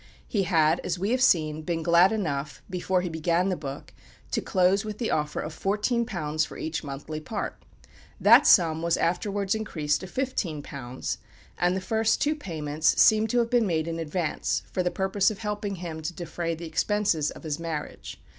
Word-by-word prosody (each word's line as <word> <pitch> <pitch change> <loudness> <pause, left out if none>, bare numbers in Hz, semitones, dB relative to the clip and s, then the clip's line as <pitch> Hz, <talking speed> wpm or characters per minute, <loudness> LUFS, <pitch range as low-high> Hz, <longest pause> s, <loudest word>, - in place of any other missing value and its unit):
He 200 -5 0
had, 160 -3 +3
as 175 - -2
we 195 +5 -1
have 255 +1 +1
seen, 155 -9 +3
been 165 0 -2
glad 170 +3 +5
enough, 150 -9 -3
before 185 0 0
he 180 - -3
began 170 +3 +1
the 185 - 0
book, 140 -4 -7 0.4
to - - 0
close 185 +2 +2
with 215 -1 -5
the 235 - -2
offer 150 -1 -1
of 155 - -4
£14 200 -7 0
for - - -10
each 160 +1 -3
monthly 145 +2 -6
part. 205 +7 -5 0.6
That - - +7
sum 160 -4 +5
was 170 0 +1
afterwards 195 +3 0
increased 160 -9 -1
to 190 - -8
£15, 150 - -3 0.4
and 175 +1 +2
the - - 0
two 185 - -12
first 220 +5 +1
payments 155 - 0
seem 220 0 +6
to 245 - 0
have 235 0 +1
been 240 -3 +3
made 160 -2 0
in 165 0 -3
advance 155 -5 -1
for 185 - 0
the 180 - +1
purpose 195 +2 +1
of 215 - -5
helping 210 -1 -3
him 165 -3 -6
to 160 +3 -4
defray 170 -1 -3
the 170 +1 -8
expenses 170 -3 +1
of - - -10
his 155 -1 -3
marriage. 165 -3 -6
175 Hz, 185 wpm, -26 LUFS, 155-205 Hz, 0.6 s, That